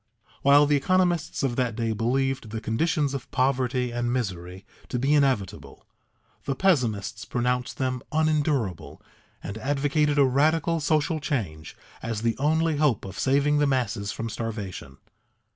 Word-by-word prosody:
While 145 +1 +6
the 145 0 +2
economists 175 0 +1
of 130 -3 0
that 125 -3 0
day 115 -1 -1
believed 130 +2 -1
the 110 +1 -4
conditions 145 +6 0
of 135 -2 -6
poverty 130 -1 0
and 120 0 -1
misery 95 -6 -4 0.2
to 125 - -2
be 135 +4 +1
inevitable, 135 -10 0 0.6
the 135 - -1
pessimists 115 - 0
pronounced 125 +2 -2
them 130 -2 -1
unendurable, 150 - 0 0.4
and 100 +2 -6
advocated 145 +3 +1
a 140 - +6
radical 155 +5 +2
social 155 +1 +1
change 95 - -4 0.2
as 115 -1 -4
the 115 -1 +1
only 160 +2 +1
hope 145 -10 +1
of 95 -1 -8
saving 145 +2 +2
the 145 - +3
masses 115 -7 -1
from 115 - -4
starvation. 105 - -6
130 Hz, 145 wpm, -25 LUFS, 115-145 Hz, 0.6 s, While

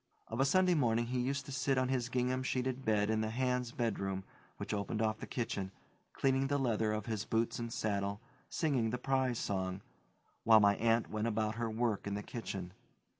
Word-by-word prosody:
Of 115 - -4
a 135 - +5
Sunday 185 +5 +4
morning 120 -6 +2
he 125 +1 -1
used 140 +3 -1
to 140 - -8
sit 135 +1 +1
on 130 0 +2
his 125 -2 0
gingham 125 +1 0
sheeted 130 0 -1
bed 105 -2 +2
in 110 0 +1
the 110 - -1
hands' 125 0 0
bedroom 95 -5 -2 0.3
which - - -4
opened 105 +1 -2
off 110 -1 +1
the - - -7
kitchen, 105 -6 -3 0.4
cleaning 135 0 +1
the 145 +1 +1
leather 110 -5 +1
of 105 -1 -2
his 110 -2 -2
boots 115 +1 0
and 115 -1 -4
saddle, 100 -4 -1 0.3
singing 135 -8 +1
the 125 - -1
"Prize 130 -1 +1
Song," 95 -2 -2 0.6
while 110 -1 +8
my 100 -1 +5
aunt 115 0 +2
went 110 +1 -1
about 110 -1 0
her 115 0 -2
work 110 -2 -1
in 100 - -1
the 105 - -4
kitchen. 95 -7 -5
115 Hz, 200 wpm, -34 LUFS, 105-130 Hz, 0.6 s, while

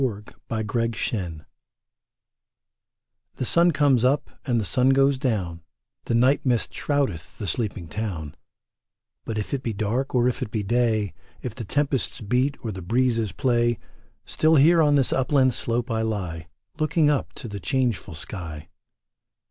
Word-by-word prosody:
THE 105 -5 -3 0.2
FALLOW 110 -1 -1 0.3
FIELD 90 -8 -3 1.9
The 130 - -2
sun 170 +7 +4
comes 140 -6 +3
up 135 +3 +2 0.2
and 120 -3 +2
the 105 - -1
sun 125 +6 +2
goes 135 0 +4
down; 95 - -1 0.4
The 115 - 0
night 130 +4 +3
mist 125 -4 0
shroudeth 135 - -2
the 105 - -5
sleeping 95 -2 -2
town; 80 -5 -4 0.9
But 110 - -3
if 105 - -3
it 135 - -1
be 115 -4 -2
dark 110 +7 -1
or 125 0 +4
if 125 - -1
it - - -2
be 105 -1 -2
day, 110 -2 +1 0.3
If 120 - -4
the 115 -1 -6
tempests 140 +3 0
beat 125 +7 +1
or 110 - -1
the 95 -2 -7
breezes 115 +2 +1
play, 120 -3 +1 0.5
Still 160 +1 +3
here 165 +4 +6
on 145 -2 +4
this 135 -3 +2
upland 130 -1 +3
slope 120 +2 -2
I 110 0 0
lie, 90 -8 -3 0.3
Looking 155 0 +3
up 145 - -1
to 130 - -8
the 100 -2 -6
changeful 115 - -1
sky. 80 -3 -7
120 Hz, 155 wpm, -24 LUFS, 105-135 Hz, 1.9 s, here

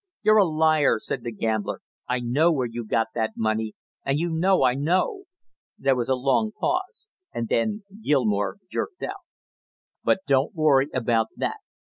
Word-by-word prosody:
"You're 215 0 +5
a 195 - +5
liar!" 155 -1 +3
said - - -4
the 120 - -4
gambler. 110 -1 -2 0.3
"I 125 0 0
know 140 +8 +3
where 135 -6 0
you 120 0 -5
got 115 +1 +1
that 110 -1 -1
money, 110 0 -1 0.3
and 135 +1 0
you 170 +2 -1
know 180 0 +3
I 125 -1 +4
know." 180 - 0 0.5
There 135 -1 +2
was 120 -1 -2
a 130 - +3
long 140 - +1
pause, 380 +4 -2 0.2
and 115 -1 -3
then 210 - 0 0.2
Gilmore 110 - +1
jerked 360 - -4
out: 395 0 -5 0.8
"But - - +2
don't 140 +3 +2
you - - -10
worry 140 -3 +5
about 115 -3 +1
that. - - -2
135 Hz, 170 wpm, -25 LUFS, 115-175 Hz, 0.8 s, You're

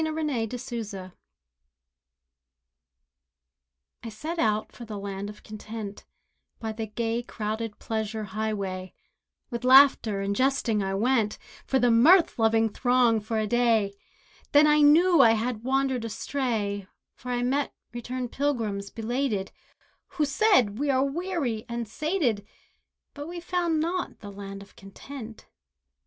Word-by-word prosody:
THE 315 - -1
LAND 290 -8 -2
OF 250 -1 -6
CONTENT 200 -6 -6 2.9
I 230 - -6
set 310 +10 -5
out 215 -3 +1
for 240 - -11
the 215 -3 -7
Land 200 0 -5
of 210 - -12
Content, 215 -1 -8 0.5
By 220 -1 -3
the 220 0 -5
gay 230 +2 -2
crowded 220 -1 -4
pleasure 220 -1 -3
highway, 195 -3 -4 0.6
With 235 0 -4
laughter, 255 -6 +6
and 200 +1 -1
jesting, 255 -4 +1
I 195 0 -1
went 225 0 +1 0.3
With 265 -2 +3
the 245 - +5
mirth 315 +8 +5
loving 225 0 +3
throng 245 0 +3
for 220 +2 -3
a 215 - +1
day; 225 -3 +2 0.6
Then 290 +1 +7
I 300 0 +5
knew 330 +4 +6
I 225 - +7
had 225 0 -2
wandered 265 -1 0
astray, 220 -4 -2 0.3
For 250 - -10
I 245 0 0
met 275 +3 0 0.2
returned 245 +1 -4
pilgrims, 225 -8 -1
belated, 225 -3 -2 0.7
Who 305 - +3
said, 275 - +3
"We 290 0 0
are 265 0 +3
weary 280 -7 -2
and 235 -1 -3
sated, 270 - -1 0.7
But 290 +1 -7
we 345 +1 -6
found 345 -2 0
not 350 +3 -2
the 205 -2 -8
Land 195 0 -8
of 200 - -20
Content." 220 +4 -10
230 Hz, 140 wpm, -27 LUFS, 215-275 Hz, 2.9 s, Then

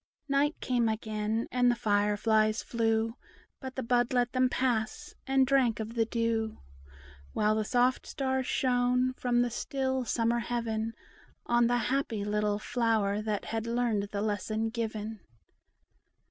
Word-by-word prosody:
Night 285 +2 +1
came 240 -3 +1
again, 220 +1 -2
and 250 -1 +3
the 240 - +3
fire 205 -2 +1
flies 215 0 +2
flew; 225 -1 0 0.5
But 260 -1 -7
the 260 - -3
bud 245 +1 +1
let 245 -1 +2
them 255 -1 +2
pass, 240 -4 -1
and 270 0 +4
drank 255 -4 +2
of 220 +1 -4
the 230 -1 +2
dew; 225 -1 -1 0.8
While 215 0 +2
the 215 0 0
soft 250 +2 +1
stars 265 -2 -1
shone, 250 0 +2
from 245 -1 +1
the 245 - -2
still 265 +1 -1
summer 235 +1 +1
heaven, 225 -1 -2 0.5
On 240 0 +3
the 245 0 +2 0.2
happy 230 -7 -1
little 210 0 0
flower 215 -3 0
that 215 -2 -2
had 225 0 -3
learned 230 -4 0
the 200 - -2
lesson 215 +1 -1
given. 220 -2 -4
230 Hz, 145 wpm, -30 LUFS, 220-250 Hz, 0.8 s, and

